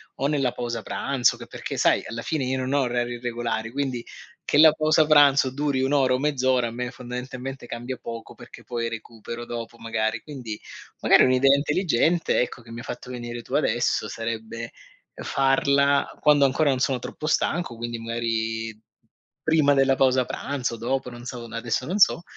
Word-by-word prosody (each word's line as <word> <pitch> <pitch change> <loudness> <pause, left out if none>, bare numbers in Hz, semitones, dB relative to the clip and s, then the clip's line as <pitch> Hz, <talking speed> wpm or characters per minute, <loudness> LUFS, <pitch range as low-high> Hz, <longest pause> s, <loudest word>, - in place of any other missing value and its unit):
o 135 - -2
nella 140 -4 0
pausa 120 -2 -4
pranzo 135 +2 +1
che - - -9
perché - - -6
sai, - - +3
alla 115 +1 -5
fine 150 -5 -1
io 130 +1 -1
non 130 +1 -2
ho 145 - +3
orari 120 -1 -1
regolari, 120 -2 -3
quindi, 130 -3 -2 0.4
che - - +1
la 155 +1 +9
pausa 155 +1 +3
pranzo 145 -3 +5
duri 140 -1 -1
1 135 - 0
ora 135 -3 +3
o - - +1
mezz'ora 130 -4 +1
a - - -6
me 125 +1 -4
fondamentalmente 125 +1 -7
cambia 120 +2 -5
poco, 115 -1 -7
perché - - -13
poi 115 -1 -3
recupero 115 +1 -7
dopo 120 0 -6
magari. 115 -1 -2
Quindi, 125 -8 -7 0.4
magari - - +6
un'idea 130 +2 +5
intelligente, 160 +2 +1
ecco 125 0 -4
che 115 - -14
mi 115 - -7
ha - - -8
fatto 125 - -7
venire 120 -1 -6
tu - - -11
adesso - - +1
sarebbe, 115 0 -5 0.4
uhm, - - -9
farla 140 +1 +2
quando 145 -2 +5
ancora 145 +3 +2
non 130 -2 +1
sono 130 0 +1
troppo 150 +5 -6
stanco, 155 -3 0
quindi 120 0 -4
magari 115 -1 -3 0.6
prima 155 -3 +4
della 135 0 +4
pausa 130 -1 +3
pranzo, 130 -2 -3
dopo, 125 +3 -2
non 120 0 -10
so, 120 -1 -6
n - - -13
adesso 115 +2 -2
non 185 +8 -2
so. 175 -3 +5
125 Hz, 180 wpm, -24 LUFS, 115-140 Hz, 0.6 s, la